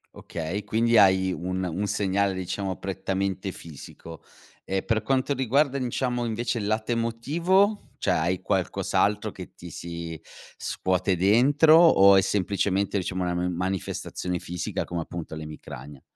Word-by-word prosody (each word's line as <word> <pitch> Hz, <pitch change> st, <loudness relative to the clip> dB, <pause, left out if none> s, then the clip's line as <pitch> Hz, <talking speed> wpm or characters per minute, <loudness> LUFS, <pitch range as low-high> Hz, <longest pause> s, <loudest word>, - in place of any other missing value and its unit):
Okay, 85 Hz, +5 st, -5 dB
quindi 115 Hz, +2 st, +2 dB
hai 95 Hz, -2 st, +5 dB
un 90 Hz, +1 st, -3 dB
un 90 Hz, +4 st, -2 dB
segnale, 100 Hz, -1 st, 0 dB
diciamo, 95 Hz, +1 st, -3 dB
prettamente 95 Hz, 0 st, -3 dB
fisico. 80 Hz, 0 st, -11 dB, 0.4 s
E 95 Hz, 0 st, -1 dB
per 110 Hz, -2 st, 0 dB
quanto 135 Hz, +3 st, +1 dB
riguarda, 135 Hz, +2 st, +2 dB
diciamo, 125 Hz, -1 st, -1 dB
invece 115 Hz, +1 st, -2 dB
il 105 Hz, -, -3 dB
lato 110 Hz, +2 st, -1 dB
emotivo? 165 Hz, -, +1 dB, 0.2 s
Cioè -, -, +1 dB
hai 90 Hz, +3 st, 0 dB
qualcos'altro 105 Hz, +1 st, 0 dB
che 90 Hz, -, -10 dB
ti 85 Hz, -, -11 dB
si 85 Hz, 0 st, -7 dB, 0.4 s
scuote 95 Hz, 0 st, 0 dB
dentro, 135 Hz, -, +5 dB
o 100 Hz, -, +7 dB
è 95 Hz, -, +6 dB
semplicemente 100 Hz, +1 st, 0 dB
diciamo 95 Hz, -1 st, -2 dB
una 90 Hz, 0 st, -1 dB
ma 90 Hz, +1 st, 0 dB
manifestazione 90 Hz, 0 st, -3 dB
fisica 90 Hz, +1 st, -4 dB
come 85 Hz, -1 st, -3 dB
appunto 80 Hz, -1 st, -7 dB
l'emicrania? 75 Hz, -3 st, -9 dB
95 Hz, 135 wpm, -26 LUFS, 90-115 Hz, 0.4 s, o